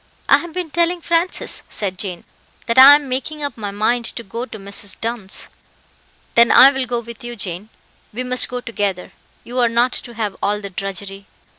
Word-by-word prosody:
"I -, -, +6 dB
have 345 Hz, -, -8 dB
been 355 Hz, -2 st, -5 dB
telling 345 Hz, +2 st, +1 dB
Francis," 340 Hz, +2 st, -1 dB
said 190 Hz, -3 st, -4 dB
Jane, 185 Hz, -4 st, -5 dB, 0.4 s
"that 230 Hz, +3 st, +3 dB
I 275 Hz, +2 st, +11 dB
am 290 Hz, -1 st, -2 dB
making 270 Hz, +4 st, -3 dB
up 285 Hz, -4 st, -3 dB
my 210 Hz, -3 st, -5 dB
mind 220 Hz, +4 st, 0 dB
to 235 Hz, -, -3 dB
go 230 Hz, +5 st, -6 dB
to 220 Hz, -, -9 dB
Mrs. 200 Hz, 0 st, -8 dB
Dunn's." 225 Hz, -4 st, -3 dB, 0.9 s
"Then 235 Hz, 0 st, +6 dB
I 270 Hz, -, +9 dB
will 265 Hz, -2 st, -2 dB
go 240 Hz, 0 st, -2 dB
with 235 Hz, 0 st, -11 dB
you, 240 Hz, 0 st, -6 dB
Jane; 195 Hz, 0 st, -5 dB, 0.4 s
we 245 Hz, +4 st, -4 dB
must 250 Hz, 0 st, +1 dB
go 250 Hz, 0 st, -4 dB
together; 205 Hz, -6 st, -3 dB, 0.3 s
you 245 Hz, +2 st, -5 dB
are 240 Hz, -1 st, +3 dB
not 240 Hz, +2 st, +2 dB
to 240 Hz, -2 st, -8 dB
have 210 Hz, -3 st, -3 dB
all 210 Hz, +1 st, 0 dB
the 200 Hz, -1 st, -8 dB
drudgery." 195 Hz, +1 st, -6 dB
235 Hz, 195 wpm, -19 LUFS, 200-255 Hz, 0.9 s, I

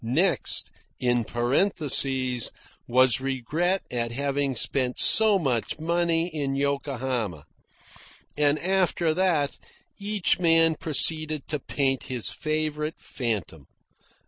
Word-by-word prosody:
Next, 150 Hz, +7 st, +1 dB, 0.3 s
in 120 Hz, -2 st, +1 dB
parentheses, 130 Hz, -, +1 dB, 0.4 s
was 130 Hz, 0 st, +3 dB
regret 150 Hz, +8 st, -1 dB
at 120 Hz, -1 st, -2 dB
having 140 Hz, +1 st, -1 dB
spent 125 Hz, +2 st, +1 dB
so 220 Hz, -2 st, +4 dB
much 130 Hz, -, -1 dB
money 170 Hz, +1 st, +1 dB
in 145 Hz, -5 st, -3 dB
Yokohama. 130 Hz, -, -2 dB, 0.9 s
And 145 Hz, 0 st, +2 dB
after 180 Hz, -2 st, +1 dB
that, 160 Hz, -5 st, 0 dB, 0.4 s
each 205 Hz, -3 st, +1 dB
man 165 Hz, -2 st, +4 dB
proceeded 155 Hz, -1 st, 0 dB
to 150 Hz, -, -1 dB
paint 135 Hz, -1 st, -1 dB
his 125 Hz, -3 st, -3 dB
favourite 155 Hz, 0 st, -2 dB
phantom. 100 Hz, -, -4 dB
145 Hz, 100 wpm, -26 LUFS, 125-165 Hz, 0.9 s, so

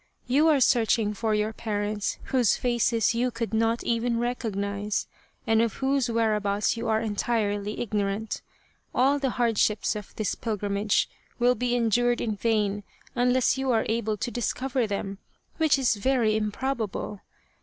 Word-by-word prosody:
You 280 Hz, +6 st, +3 dB
are 295 Hz, -3 st, +4 dB
searching 225 Hz, -4 st, +3 dB
for 220 Hz, 0 st, 0 dB
your 210 Hz, +1 st, 0 dB
parents 210 Hz, -1 st, -2 dB, 0.2 s
whose 250 Hz, -4 st, +4 dB
faces 235 Hz, -2 st, +1 dB
you 245 Hz, +2 st, +1 dB
could 230 Hz, -3 st, -4 dB
not 225 Hz, +1 st, +1 dB
even 235 Hz, 0 st, 0 dB
recognize, 210 Hz, -4 st, -2 dB, 0.4 s
and 225 Hz, 0 st, +3 dB
of 230 Hz, -3 st, +1 dB
whose 270 Hz, -2 st, 0 dB
whereabouts 210 Hz, -3 st, +1 dB
you 230 Hz, +1 st, -4 dB
are 220 Hz, 0 st, +3 dB
entirely 210 Hz, -1 st, -1 dB
ignorant. 210 Hz, -1 st, -2 dB, 0.5 s
All 275 Hz, +3 st, +3 dB
the 275 Hz, -1 st, 0 dB
hard 235 Hz, -3 st, +1 dB
ships 210 Hz, 0 st, +1 dB
of 210 Hz, -2 st, -8 dB
this 215 Hz, -3 st, -1 dB
pilgrimage 205 Hz, -2 st, 0 dB, 0.3 s
will 245 Hz, +1 st, +4 dB
be 245 Hz, 0 st, -1 dB
endured 240 Hz, +1 st, +2 dB
in 220 Hz, -2 st, -1 dB
vain 205 Hz, -1 st, 0 dB, 0.3 s
unless 250 Hz, +1 st, +2 dB
you 265 Hz, 0 st, -1 dB
are 225 Hz, -2 st, +2 dB
able 220 Hz, -1 st, -1 dB
to 240 Hz, -, -3 dB
discover 250 Hz, +1 st, -1 dB
them, 200 Hz, -1 st, -4 dB, 0.4 s
which 315 Hz, -3 st, +3 dB
is 265 Hz, -3 st, +2 dB
very 225 Hz, 0 st, +1 dB
im 215 Hz, -1 st, 0 dB
probable. 220 Hz, -5 st, -3 dB
225 Hz, 155 wpm, -26 LUFS, 210-245 Hz, 0.5 s, are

